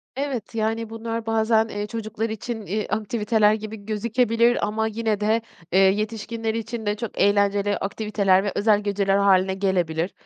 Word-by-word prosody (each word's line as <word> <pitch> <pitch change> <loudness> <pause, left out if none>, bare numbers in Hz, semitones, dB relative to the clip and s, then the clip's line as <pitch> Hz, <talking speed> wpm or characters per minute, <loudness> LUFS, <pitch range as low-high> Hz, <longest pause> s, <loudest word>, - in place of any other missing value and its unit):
Evet. 260 -6 -4
Yani, 225 0 -1
bunlar 225 0 -4
bazen, 225 0 +2
eee, 205 -1 -4
çocuklar 225 0 -4
için, 220 0 -5
eee, 210 +2 -2
aktiviteler 215 0 +1
gibi 215 -1 -6
gözükebilir 230 +2 +1
ama 220 +1 -1
yine 220 -1 -1
de, 220 +2 +1 0.3
eee, 190 - +4
yetişkinler 220 +3 0
için 225 0 -4
de 205 0 0
çok 220 0 -6
eğlenceli 200 0 +2
aktiviteler 200 -2 +1
ve 205 - -1
özel 210 0 +3
geceler 200 -1 +1
hâline 190 -1 +3
gelebilir. 180 -3 0
215 Hz, 150 wpm, -23 LUFS, 200-225 Hz, 0.3 s, eee